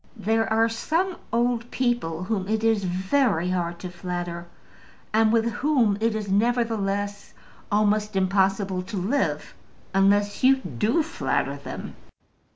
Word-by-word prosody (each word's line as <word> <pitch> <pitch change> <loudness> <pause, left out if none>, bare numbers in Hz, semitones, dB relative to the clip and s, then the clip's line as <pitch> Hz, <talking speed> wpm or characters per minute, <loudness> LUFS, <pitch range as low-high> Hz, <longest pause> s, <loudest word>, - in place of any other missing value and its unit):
There 225 +1 0
are 225 +1 +4
some 330 +11 -1 0.2
old 235 0 0
people 240 -10 -1
whom 190 -1 -2
it 220 +1 -1
is 220 -3 +2
very 185 - +1
hard 170 -2 -2
to 180 - -6
flatter, 175 -1 -5 0.7
and 220 0 +4
with 230 0 +3
whom 245 -4 +2
it 225 -1 +1
is, 215 -2 -3
nevertheless, 205 -2 0 0.4
almost 210 0 +1
impossible 195 0 +1
to 190 +3 -6
live 220 +10 -1 0.4
unless 205 +2 +2
you 265 +1 +7
do 225 - 0
flatter 325 - -1
them. - - -8
210 Hz, 130 wpm, -25 LUFS, 190-230 Hz, 0.7 s, you